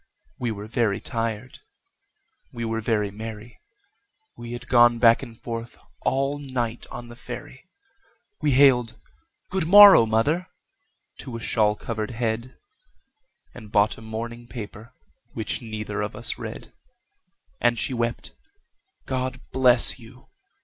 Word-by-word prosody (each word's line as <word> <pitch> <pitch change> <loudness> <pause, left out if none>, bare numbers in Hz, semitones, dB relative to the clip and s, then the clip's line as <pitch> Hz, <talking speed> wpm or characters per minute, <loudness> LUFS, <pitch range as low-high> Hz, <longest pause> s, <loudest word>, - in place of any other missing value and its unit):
We 120 - -1
were 105 -2 -5
very 110 -2 0
tired, 115 +2 -4 0.9
we 115 -1 -5
were 115 0 -2
very 105 -3 0
merry, 110 +2 -9 0.8
We 120 0 -8
had 120 +1 -8
gone 120 -1 +5
back 115 -1 +5
and 115 -4 -10
forth 115 0 -6 0.2
all 135 +2 0
night 125 -4 -4
on 120 0 -8
the 120 - -11
ferry, - - -10 0.7
We 145 - +2
hailed 125 -4 +4 0.5
"Good 185 -4 0
morrow, 200 - +9
mother!" 145 +11 +1 0.7
to 120 -3 -7
a - - -7
shawl 105 -2 +1
covered 110 -1 -4
head, 115 +1 -3 1.0
And 110 -4 -12
bought 105 +1 +3
a - - -14
morning 115 +2 -7
paper, 110 -1 -9 0.4
which 110 +2 -3
neither 105 -3 -5
of 105 +1 -4
us 115 +2 -2
read; - - -8 0.9
And 120 -1 +2
she 130 - -2
wept, 115 -1 -3 0.7
"God 130 0 -3
bless 125 -1 +5
you!" 125 +2 -16
115 Hz, 130 wpm, -24 LUFS, 110-125 Hz, 1.0 s, morrow